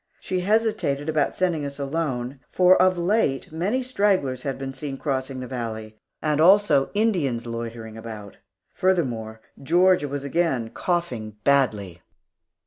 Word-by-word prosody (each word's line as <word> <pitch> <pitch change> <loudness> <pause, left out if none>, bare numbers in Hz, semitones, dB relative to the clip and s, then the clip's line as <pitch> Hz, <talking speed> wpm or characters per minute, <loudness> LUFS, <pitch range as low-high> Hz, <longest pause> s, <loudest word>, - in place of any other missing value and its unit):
She 185 - -2
hesitated 185 -8 0
about 155 -2 +1
sending 175 -5 0
us 140 0 -5
alone, 140 -3 -3
for 185 0 +5
of 185 0 +4
late 175 -7 0
many 200 +11 -1
stragglers 195 - +1
had 135 -1 -3
been 135 0 -5
seen 135 0 -6
crossing 130 -2 -3
the 125 - -6
valley, 110 -3 -6 0.2
and 155 -1 +1
also 175 -6 +5
Indians 170 - +1
loitering 115 -1 -6
about. 110 -3 -9 0.4
Furthermore, 120 - -1 0.2
Georgia 175 +2 +3
was 140 0 -4
again 140 -6 0
coughing 125 - -2
badly. 105 -11 +1
140 Hz, 135 wpm, -24 LUFS, 120-180 Hz, 0.4 s, for